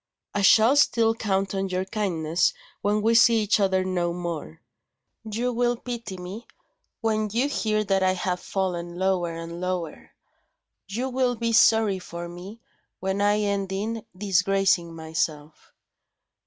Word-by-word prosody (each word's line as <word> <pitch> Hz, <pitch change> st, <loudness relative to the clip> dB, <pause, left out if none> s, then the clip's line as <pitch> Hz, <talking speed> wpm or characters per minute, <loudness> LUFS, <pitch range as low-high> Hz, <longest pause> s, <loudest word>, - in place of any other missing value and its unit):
I 205 Hz, -, 0 dB
shall 220 Hz, +6 st, +6 dB
still 230 Hz, -5 st, +4 dB
count 195 Hz, -3 st, -1 dB
on 195 Hz, 0 st, -2 dB
your 185 Hz, 0 st, -1 dB
kindness 175 Hz, -5 st, 0 dB, 0.3 s
when 210 Hz, +1 st, +1 dB
we 225 Hz, +1 st, +3 dB
see 230 Hz, -1 st, +5 dB
each 210 Hz, +1 st, +2 dB
other 190 Hz, -2 st, +2 dB
no 175 Hz, -2 st, -1 dB
more. 170 Hz, -, -5 dB, 0.7 s
You 245 Hz, +4 st, -1 dB
will 240 Hz, 0 st, +1 dB
pity 235 Hz, -5 st, -6 dB
me, 185 Hz, +6 st, -8 dB, 0.5 s
when 215 Hz, -1 st, 0 dB
you 240 Hz, +6 st, +1 dB
hear 215 Hz, -6 st, 0 dB
that 195 Hz, -1 st, +1 dB
I 185 Hz, 0 st, +3 dB
have 180 Hz, -1 st, -2 dB
fallen 175 Hz, -3 st, -3 dB
lower 180 Hz, -3 st, 0 dB
and 165 Hz, +1 st, -7 dB
lower; 180 Hz, -3 st, -4 dB, 0.7 s
you 235 Hz, +7 st, -3 dB
will 255 Hz, -1 st, 0 dB
be 230 Hz, 0 st, -1 dB
sorry 220 Hz, -3 st, +4 dB
for 170 Hz, -1 st, -7 dB
me, 180 Hz, +6 st, -10 dB, 0.4 s
when 190 Hz, +1 st, -2 dB
I 205 Hz, +1 st, +3 dB
end 200 Hz, -2 st, -1 dB
in 215 Hz, +3 st, -3 dB
disgracing 190 Hz, -3 st, +1 dB
myself." 160 Hz, -1 st, -4 dB
195 Hz, 145 wpm, -25 LUFS, 180-220 Hz, 0.7 s, shall